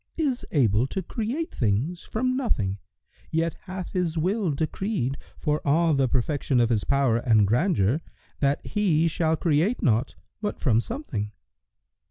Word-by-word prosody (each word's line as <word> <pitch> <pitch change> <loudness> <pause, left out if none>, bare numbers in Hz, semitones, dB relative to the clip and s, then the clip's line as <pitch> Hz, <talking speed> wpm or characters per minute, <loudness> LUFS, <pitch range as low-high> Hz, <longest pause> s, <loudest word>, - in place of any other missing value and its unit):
is 280 -6 0
able 120 - +3
to 190 +6 -4
create 240 - -3
things 125 - 0
from 255 +3 -1
nothing,[FN#118] 105 - 0 0.5
yet 165 +1 0
hath 185 -2 -6
His 175 -3 -1
will 190 +4 +1
decreed, 155 - -1 0.2
for 150 -1 0
all 160 +3 +3
the 135 -2 +2
perfection 130 +1 0
of 120 -1 +3
His 110 -4 +1
power 140 -4 +2
and 110 -3 +4
grandeur, 125 - +2 0.4
that 140 0 +1
He 170 -6 +2
shall 160 0 +1
create 170 +8 +1
naught 120 +1 +2 0.3
but 210 - -3
from 115 -5 +3
something." 120 - -4
155 Hz, 145 wpm, -26 LUFS, 120-190 Hz, 0.5 s, and